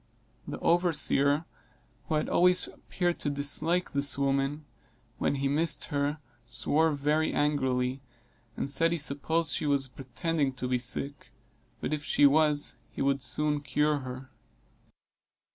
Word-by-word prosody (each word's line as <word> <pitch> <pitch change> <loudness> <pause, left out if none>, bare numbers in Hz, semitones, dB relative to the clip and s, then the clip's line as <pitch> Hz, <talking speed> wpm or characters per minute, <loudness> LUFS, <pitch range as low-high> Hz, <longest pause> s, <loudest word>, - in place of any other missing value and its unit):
The - - -5
overseer, 160 -3 +3 0.6
who 160 - -1
had 150 - 0
always 180 +1 +4
appeared 175 -1 -3
to 145 - -1
dislike 150 +5 +2
this 140 0 +2
woman, 140 +2 -1 0.5
when - - 0
he 140 0 -1
missed 155 +4 +1
her, 145 +1 0 0.3
swore 160 +6 +2
very 150 +2 0
angrily, 130 -3 0 0.6
and - - -2
said 165 +4 +2
he - - -1
supposed 155 +2 -1
she 150 - -1
was 140 -2 +1
pretending 135 +3 -3
to 125 0 -5
be 125 0 0
sick, 135 +3 -3 0.5
but - - -3
if 150 -1 -3
she 145 - +3
was 150 0 +3
he - - -4
would 140 0 +1
soon 150 +2 0
cure 150 0 0
her. 130 0 -9
145 Hz, 140 wpm, -28 LUFS, 135-155 Hz, 0.6 s, always